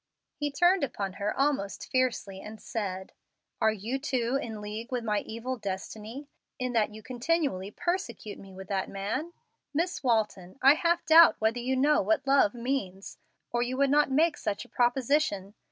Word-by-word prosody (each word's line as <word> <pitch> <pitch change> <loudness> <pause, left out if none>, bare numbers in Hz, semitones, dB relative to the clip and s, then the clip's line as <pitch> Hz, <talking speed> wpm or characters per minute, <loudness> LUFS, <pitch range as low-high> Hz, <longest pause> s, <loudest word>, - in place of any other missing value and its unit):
He 295 0 -2
turned 350 +4 +3
upon 200 -8 -3
her 205 +1 +1
almost 270 -9 -1
fiercely, 235 -7 0
and 215 +1 -9
said, 190 -3 -4 0.5
"Are 220 - +5
you 220 +6 -3
too 255 -3 -1
in 220 -2 -6
league 215 +4 -6
with 250 -2 -1
my 210 -2 +1
evil 245 +3 -4
destiny, 215 +6 -6 0.3
in 255 -1 -2
that 220 -2 +2
you 215 0 -11
continually 255 - -1
persecute 240 - -3
me 195 - -12
with 190 0 -10
that 195 -2 -1
man? 220 +12 -3 0.4
Miss 345 +4 0
Walton, 215 -7 0
I 275 +2 +7
half 340 +2 +1
doubt 325 +2 +8
whether 220 +2 +1
you 255 +2 0
know 290 +3 +4
what 320 -4 +1
love 270 -6 +4
means, 235 -6 -3 0.3
or 240 - 0
you 250 +2 -1
would 275 0 +3
not 295 0 +4
make 310 +4 +3
such 205 -2 -3
a - - -19
proposition. 245 -5 +1
240 Hz, 170 wpm, -29 LUFS, 210-280 Hz, 0.5 s, doubt